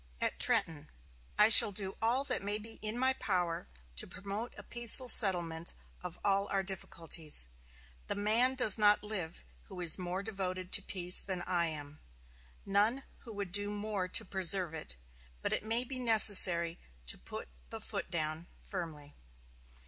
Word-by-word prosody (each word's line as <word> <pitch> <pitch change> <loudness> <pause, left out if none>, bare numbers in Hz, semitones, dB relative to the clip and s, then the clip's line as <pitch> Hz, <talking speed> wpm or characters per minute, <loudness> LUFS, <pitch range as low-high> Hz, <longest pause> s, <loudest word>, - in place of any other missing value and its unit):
At - - -4
Trenton: 155 -2 0 0.5
"I 210 - +3
shall 215 -1 +8
do 195 -1 -5
all 240 +4 -1
that - - -4
may 205 +1 -2
be 225 +1 -10
in 215 +2 -2
my 260 +1 -1
power 175 - -5 0.3
to - - -4
promote 200 +4 -9
a - - -12
peaceful 240 +2 +3
settlement 175 -7 +5 0.3
of 180 -1 -10
all 200 0 -1
our 195 -1 -3
difficulties. 165 - -4 0.6
The - - -4
man 225 +6 -1
does 220 -5 +2
not 210 0 +1
live 190 - -7 0.2
who - - -13
is 170 0 +3
more 180 +2 -7
devoted 185 -3 -7
to - - +7
peace 180 -1 +1
than 185 -3 -6
I 175 -2 -2
am, 150 -1 -9 0.7
none 210 +7 -2 0.2
who 230 - -14
would 200 -3 -7
do 205 +1 -1
more 205 -2 -6
to 220 +4 +1
preserve 185 -2 0
it, 65 - -7 0.5
but - - -4
it - - -3
may 225 +3 0
be 255 +1 -9
necessary 190 -7 +7 0.3
to - - -2
put - - -10 0.2
the - - -10
foot - - -7
down 155 +1 -6 0.2
firmly." 150 -4 -10
195 Hz, 165 wpm, -29 LUFS, 170-215 Hz, 0.7 s, shall